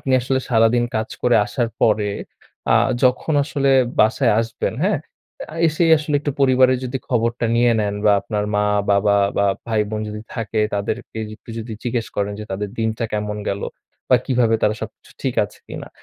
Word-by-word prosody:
আপনি 135 - -2
আসলে 130 +2 0
সারাদিন 115 0 +3
কাজ 110 0 -2
করে 120 -1 +4
আসার 120 +2 -1
পরে 105 -2 +3 0.6
আ - - +6 0.3
যখন 130 +5 +2
আসলে 140 -2 0 0.3
বাসায় 115 +1 +3
আসবেন, 115 -1 -3
হ্যাঁ? 200 -5 +2 0.5
আ - - -9
এসেই 165 +1 +2
আসলে 150 -1 -3
একটু 145 - -2
পরিবারের 130 -1 +4
যদি 130 +1 -3
খবরটা 115 -1 0
নিয়ে 120 0 +4
নেন, 100 -1 -1
বা 105 - +6
আপনার 105 +1 -2
মা-বাবা 105 0 +2 0.2
বা 100 - +3 0.2
ভাই-বোন 110 -1 -1
যদি 105 0 -6
থাকে 110 -2 -2
তাদেরকে 110 +3 -4 0.2
একটু - - -14
যদি 115 0 -6
জিজ্ঞেস 120 -2 -1
করেন 100 0 -1
যে - - -5
তাদের 100 +2 -3
দিনটা 110 +1 -1
কেমন 105 0 -2
গেল 100 0 -2 0.5
বা 125 - +7
কিভাবে 120 -3 +2
তারা 105 - +3
সবকিছু - - -9
ঠিক - - -1
আছে - - -13
কিনা। - - -7
115 Hz, 170 wpm, -20 LUFS, 105-125 Hz, 0.6 s, বা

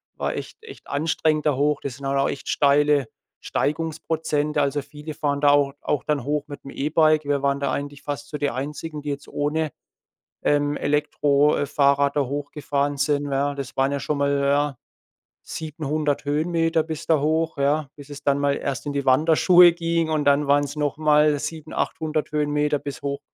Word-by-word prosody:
war - - -2
echt 445 - -8
echt 430 -3 -13
anstrengend 155 +1 0
da 145 - +2
hoch. 145 +2 +1
Das 135 -3 -5
sind 140 +1 -9
halt 135 0 0
auch 135 - +2
echt 135 - -6
steile 145 -1 +3 0.3
Steigungsprozente. 155 -1 -1
Also, 140 0 0
viele 150 +1 -9
fahren 145 -1 -1
da 145 - +5
auch 145 -1 +3
auch 145 - -1
dann 150 -4 -1
hoch 145 +2 -1
mit 145 -1 -9
'm 135 - -9
E-Bike. 155 +2 +2
Wir 145 -1 0
waren 140 0 +1
da 140 -1 -1
eigentlich 145 0 -5
fast 145 0 -5
so 150 - -4
die 145 -1 -1
Einzigen, 150 +3 -5
die 145 - -5
jetzt 140 0 -5
ohne, 150 +1 -1 0.7
ähm, 145 0 +1
Elektro 145 0 +2
äh, - - 0
Fahrrad 140 0 +2
da - - +3
hochgefahren 145 0 -2
sind, 145 0 +1
ja? 140 +1 0
Das 140 -1 -6
waren 135 +1 +3
ja 140 - -2
schon 150 +1 -2
mal, 140 0 +1
ja, 140 0 +1 0.7
700 150 -2 -3
Höhenmeter 165 +2 +1
bis 160 -1 -6
da 160 -3 +3
hoch, 160 +1 0
ja? 140 +1 +1
Bis 145 -1 -13
es 145 0 -9
dann 140 -1 +2
mal 140 0 +1
erst 135 0 -4
in 145 - -3
die 140 -1 -1
Wanderschuhe 165 +6 +6
ging 170 -1 0
und 155 -2 0
dann 145 +1 +3
waren's 145 0 +2
noch 145 -2 -1
mal 150 -1 +3
7, 155 +1 -6
800 155 -1 -2
Höhenmeter 150 0 +1
bis 140 0 -7
hoch 140 0 -3
145 Hz, 190 wpm, -23 LUFS, 140-155 Hz, 0.7 s, Wanderschuhe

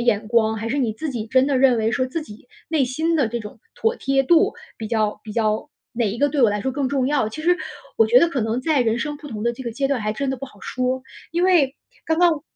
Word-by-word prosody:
眼 215 -2 +2
光， 220 -1 +2
还 225 +1 -4
是 280 - 0
你 235 -5 0
自 310 +7 -4
己 230 -4 -4
真 260 +3 +3
的 280 -2 +1
认 255 -2 +5
为 220 0 +1
说 255 +2 +1
自 310 +5 -4
己 240 -3 -14 0.2
内 305 -4 +2
心 320 +6 0
的 275 -7 +2
这 235 +1 -3
种 210 0 -10
妥 475 -1 0
贴 270 -6 +1
度 345 +9 +4 0.2
比 220 - -4
较 215 -2 0
比 215 - -9
较 215 -1 0 0.2
哪 230 -3 0
一 210 - -4
个 285 +4 +2
对 290 0 0
我 235 - +6
来 205 0 -2
说 265 - -1
更 275 -1 -1
重 265 -2 0
要。 275 -6 +1
其 310 +8 -7
实 355 +2 +3 0.4
我 225 - +6
觉 235 +3 +6
得 340 - +4
可 275 - -1
能 225 +3 -1
在 310 -4 +2
人 230 -1 +1
生 295 +3 -3
不 295 - -10
同 215 -5 -6
的 235 +1 +1
这 250 +2 -9
个 235 - -4
阶 270 +4 -1
段 275 -3 0
还 210 0 -1
真 275 +3 -2
的 265 - -3
不 275 - -6
好 210 - -18
说。 255 +4 -2 0.3
因 345 +2 +1
为 305 -7 +3 0.3
刚 320 0 +1
刚 335 -4 +3
255 Hz, 300 characters per minute, -22 LUFS, 225-290 Hz, 0.4 s, 我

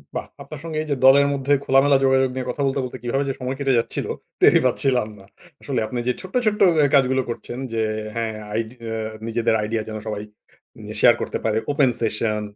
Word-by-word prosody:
বাহ! - - -3 0.2
আপনার 155 - -9
সঙ্গে 160 -2 -5
এইযে 145 -2 -2
দলের 140 +2 +7
মধ্যে 140 +1 0
খোলামেলা 135 +1 +4
যোগাযোগ 130 0 +3
নিয়ে 130 -1 -3
কথা 140 - -3
বলতে, 135 0 0
বলতে 125 - -7
কীভাবে 135 +4 0
যে 135 - -1
সময় 130 +1 -3
কেটে 135 -3 +2
যাচ্ছিল? 115 - -3 0.4
টেরই - - +6
পাচ্ছিলাম 125 -2 +1
না। 95 - -16 0.4
আসলে 135 -4 -2
আপনি 125 - -4
যে 125 - +2
ছোট্ট, 185 +4 -10
ছোট্ট 210 -1 +1 0.2
এ - - +4
কাজগুলো 130 -1 +3
করছেন 120 +1 -6 0.2
যে, 115 - 0 0.3
হ্যাঁ, 115 -2 -2 0.2
আইডি 115 +2 -3 0.2
এ - - -2 0.3
নিজেদের 115 0 +1
আইডিয়া 110 +1 -1
যেন 110 0 -5
সবাই 105 -1 -4 0.5
মানে - - -13
য়ে - - -6
শেয়ার - - +7
করতে - - -3
পারে। 110 -1 +1
Open 140 -2 +3
session, 105 -1 -1
130 Hz, 205 wpm, -22 LUFS, 115-135 Hz, 0.5 s, দলের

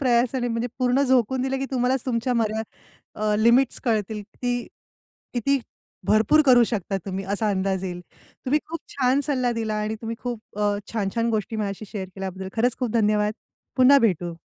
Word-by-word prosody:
प्रयासाने 245 -1 +2
म्हणजे 230 +1 -1
पूर्ण 255 +2 +3
झोकून 260 -1 +2
दिलं, 270 0 -1
की 270 - -2
तुम्हालाच 255 0 +1
तुमच्या 245 0 0
मर्या 220 -1 0 0.5
अ, 210 0 0
लिमिट्स 235 +4 +4
कळतील. 215 -2 0
किती 245 -1 -1 0.8
किती 275 +4 +2 0.5
भरपूर 220 +8 +5
करू 245 -2 +7
शकता 200 -3 -2
तुम्ही 195 0 -3
असा 215 +1 0
अंदाज 190 -1 -1
येईल. 180 -1 -4 0.4
तुम्ही 285 +4 +3
खूप 335 +1 -5
छान 265 +1 +2
सल्ला 255 -4 +1
दिला 220 -1 -1
आणि 215 +1 -2
तुम्ही 230 0 -4
खूप 235 -4 -6
अ, 205 -1 +2 0.2
छान-छान 230 +2 0
गोष्टी 220 0 -2
माझ्याशी 205 0 -3
शेअर 195 -3 -4
केल्याबद्दल 190 0 -5
खरंच 245 +2 +2
खूप 250 -4 -1
धन्यवाद. 210 -2 +2 0.4
पुन्हा 270 +2 +7
भेटू. 175 - 0
230 Hz, 165 wpm, -24 LUFS, 210-250 Hz, 0.8 s, करू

